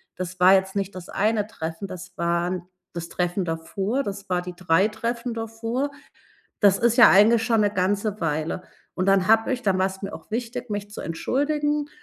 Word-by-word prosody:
das 185 0 -6
war 185 +1 +7
jetzt 190 0 0
nicht 195 -1 -2
das 180 -2 -9
eine 210 0 0
Treffen, 165 -3 -6
das 185 0 -9
waren 170 +1 -1 0.3
das 170 -1 -6
Treffen 180 +2 -1
davor, 190 +10 -2
das 200 -3 -6
war 180 -1 +1
die 180 0 -7
3 180 +2 +3
Treffen 235 +2 -3
davor“. 225 +4 -3 0.7
Das 200 -2 +5
ist 235 0 +2
ja 240 - +9
eigentlich 225 +4 +5
schon 230 -2 +2
'ne 205 - +2
ganze 205 +2 -1
Weile. 155 +1 -2 0.3
Und 185 - -1
dann 195 -1 +3
habe 225 +4 +4
ich 255 0 -3
dann 195 -4 +1
war's 190 +1 -1
mir 195 - -5
auch - - -12
wichtig, 240 +1 -4
mich 205 0 -4
zu 205 - -7
entschuldigen. 295 - -1
200 Hz, 190 wpm, -24 LUFS, 180-225 Hz, 0.7 s, ja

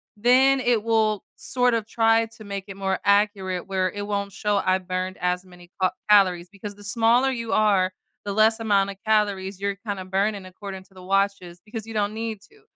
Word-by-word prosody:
then 255 +5 +4
it 240 -4 +2
will 220 -2 +1
sort 250 -1 +1
of 225 -2 0
try 225 0 +2
to 215 - -12
make 200 -1 -5
it 195 - -8
more 190 -1 -1
accurate 200 -3 +1
where 190 -1 0
it 205 0 -5
won't 200 -1 -2
show 205 0 0
I 185 0 +3
burned 185 0 -4
as 180 0 -1
many 180 -1 -16
ca 185 - +3 0.2
calories, 185 -4 +4
because 205 0 -9
the 205 - -15
smaller 235 +5 +3
you 230 -3 -3
are, 200 -3 +3 0.3
the 205 - -2
less 220 +2 +4
amount 200 -3 +2
of 200 - -6
calories 200 -3 +1
you're 200 0 -1
kinda 200 -3 -4
burning 195 +1 -1
according 190 +1 -8
to 190 - -26
the 185 - -13
watches 195 -2 -1
because 220 0 -7
you 225 - -8
don't 210 -1 0
need 220 -2 -4
to, 425 - -22
200 Hz, 200 wpm, -24 LUFS, 190-220 Hz, 0.3 s, then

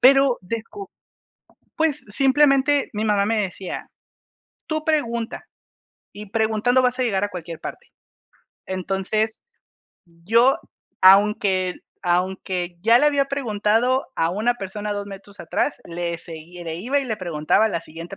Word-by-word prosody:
Pero, 270 0 +5
descu 230 - -6 0.9
pues 315 -2 +1
simplemente, 275 +4 +3
mi 210 +1 -2
mamá 205 -2 +2
me 225 +2 +1
decía: 190 -1 -5 0.8
"Tú 310 -1 -2
pregunta, 235 -7 -1 0.6
y 205 -1 -10
preguntando 225 +3 +2
vas 250 0 +1
a - - +2
llegar 200 -4 0
a 205 - -1
cualquier 170 -3 -7
parte". - - -9 0.8
Entonces, 195 +4 -1 0.8
yo, 240 - +4 0.4
aunque 190 -1 +4 0.3
aunque 180 0 -1
ya 230 +4 +6
le 295 - +4
había 280 -2 +2
preguntado 245 -1 +1
a 165 +1 +1
una 220 +6 +1
persona 205 0 -5
2 205 0 -4
metros 200 0 -11
atrás, 290 - -1
le 170 0 -3
seguía 170 +2 -10
le 165 -1 -4
iba 250 +11 0
y 275 - -4
le 220 -4 -2
preguntaba 170 +1 +1
a - - +1
la 170 -5 -2
siguiente 165 +4 -9
210 Hz, 140 wpm, -22 LUFS, 185-250 Hz, 0.9 s, ya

